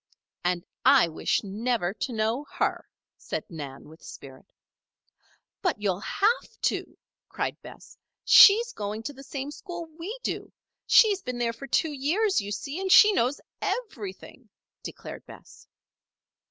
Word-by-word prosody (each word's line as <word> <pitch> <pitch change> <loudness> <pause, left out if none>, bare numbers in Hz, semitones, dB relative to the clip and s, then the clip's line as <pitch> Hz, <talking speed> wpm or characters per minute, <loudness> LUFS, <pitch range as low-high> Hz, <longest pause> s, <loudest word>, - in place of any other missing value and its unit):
"And 175 -1 -1 0.2
I - - +6
wish 160 - -1
never 210 -1 -1
to 250 - -4
know 225 +4 -1
her," - - -2 0.3
said - - -5
Nan, 140 -5 -8
with 160 +2 -16
spirit. 135 -1 -12 1.1
"But 360 - 0
you'll 195 -3 -1
have 410 - -1
to," - - -1 0.3
cried - - -4
Bess. - - -14 0.3
"She's 465 +4 +8
going 210 +2 -5
to 290 - -5
the 270 - -13
same 275 +1 -6
school 345 +1 -7
we 405 +9 -5
do. - - -4 0.4
She's 410 -4 +5
been 250 -5 -5
there 235 -1 -1
for 275 +4 -10
two 315 +4 +1
years, 320 - +1
you 200 0 -6
see, 275 - -4
and 380 -1 -1
she 420 +2 +8
knows 255 -4 +1 0.2
everything," 235 - -5 0.3
declared - - -9
Bess. - - -15
250 Hz, 140 wpm, -26 LUFS, -, 1.1 s, She's